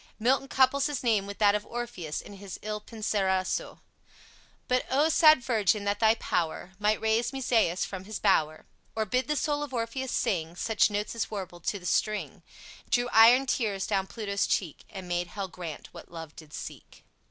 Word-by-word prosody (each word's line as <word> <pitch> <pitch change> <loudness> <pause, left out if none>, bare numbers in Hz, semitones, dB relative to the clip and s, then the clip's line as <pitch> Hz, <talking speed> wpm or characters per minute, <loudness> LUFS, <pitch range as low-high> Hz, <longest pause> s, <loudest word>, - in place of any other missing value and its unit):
Milton 265 +4 +2
couples 270 +2 +3
his 290 -3 -4
name 215 -5 +2
with 200 - -7
that 205 -1 +5
of 210 0 -1
Orpheus 220 -11 -5
in - - -12
his 200 -1 -8
"Il 210 0 -4
Penseroso": 200 -4 -1 0.9
"But 250 0 +2
O, 290 +4 +3
sad 310 -5 +6
virgin, 215 -4 +1
that 205 0 -1
thy 220 0 +5
power 175 -3 -2
Might 210 +1 +2
raise 220 +2 +1
Musaeus 235 -9 +1
from 190 -1 -7
his 215 0 -5
bower, 155 -6 +1 0.3
Or 220 -1 0
bid 250 +5 0
the 300 - 0
soul 290 +1 0
of 290 -3 -5
Orpheus 240 +3 -3
sing 165 -3 -1
Such 220 +4 +2
notes 210 0 -2
as 230 - -2
warbled 180 -5 -7
to 205 - 0
the 180 - -12
string, 215 +3 -1 0.5
Drew 245 0 +1
iron 235 +4 +7
tears 210 -7 -1
down 195 -3 0
Pluto's 200 -2 -2
cheek, 170 -7 -2
And 190 -3 -8
made 175 0 -1
Hell 195 0 -5
grant 170 -4 -8
what - - -12
love 165 -2 -9
did 155 -2 -13
seek." - - -9
210 Hz, 185 wpm, -28 LUFS, 190-240 Hz, 0.9 s, iron